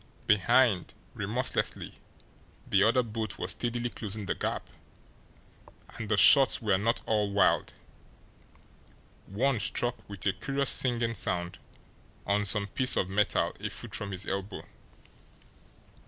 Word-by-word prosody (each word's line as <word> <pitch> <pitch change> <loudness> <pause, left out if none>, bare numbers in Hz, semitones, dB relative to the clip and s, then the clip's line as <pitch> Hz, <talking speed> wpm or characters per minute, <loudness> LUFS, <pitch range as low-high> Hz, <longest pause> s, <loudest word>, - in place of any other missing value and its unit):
Behind, 105 -1 +2 0.2
remorselessly, - - -2 0.7
the 100 - +2
other 115 +4 +3
boat 110 -2 -5
was - - -1
steadily 120 0 -2
closing 105 -1 -5
the - - -1
gap; - - -4 1.2
and 110 - -8
the 110 - +1
shots 135 +7 +6
were 105 -5 0
not 115 +3 0
all 105 -2 0
wild 100 -2 +1 1.5
one 120 +5 0
struck, 115 +4 -3
with 100 -2 -9
a 100 - +2
curious 135 +8 0
singing 120 -2 +3
sound, 90 -4 -2 0.7
on 105 +1 0
some 100 +1 +2
piece 125 +6 +3
of 90 - 0
metal 105 +2 0
a - - -4
foot - - -5
from 100 - -3
his 95 +1 -4
elbow. 95 +1 -5
105 Hz, 125 wpm, -28 LUFS, 100-120 Hz, 1.5 s, shots